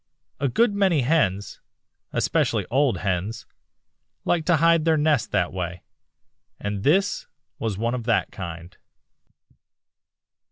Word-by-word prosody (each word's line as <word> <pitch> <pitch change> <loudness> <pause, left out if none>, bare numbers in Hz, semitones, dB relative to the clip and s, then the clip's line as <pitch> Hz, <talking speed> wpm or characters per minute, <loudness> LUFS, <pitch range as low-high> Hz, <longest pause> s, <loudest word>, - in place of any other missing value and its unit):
A 140 - +1
good 220 - +2
many 190 -7 +2
hens, 120 - 0 0.5
especially - - +1
old 135 0 +2
hens, 95 +5 -2 0.8
like 165 -3 +1
to 175 - +4
hide 165 +1 +4
their 160 -1 +3
nests 150 -4 +2
that 90 -1 0
way, 90 -2 -4 0.8
and 105 -1 -3
this 190 - +2 0.3
was 110 -4 -2
one 115 +3 -1
of 120 -3 -4
that 115 -2 +1
kind. 85 -2 -8
120 Hz, 120 wpm, -24 LUFS, 95-160 Hz, 0.8 s, to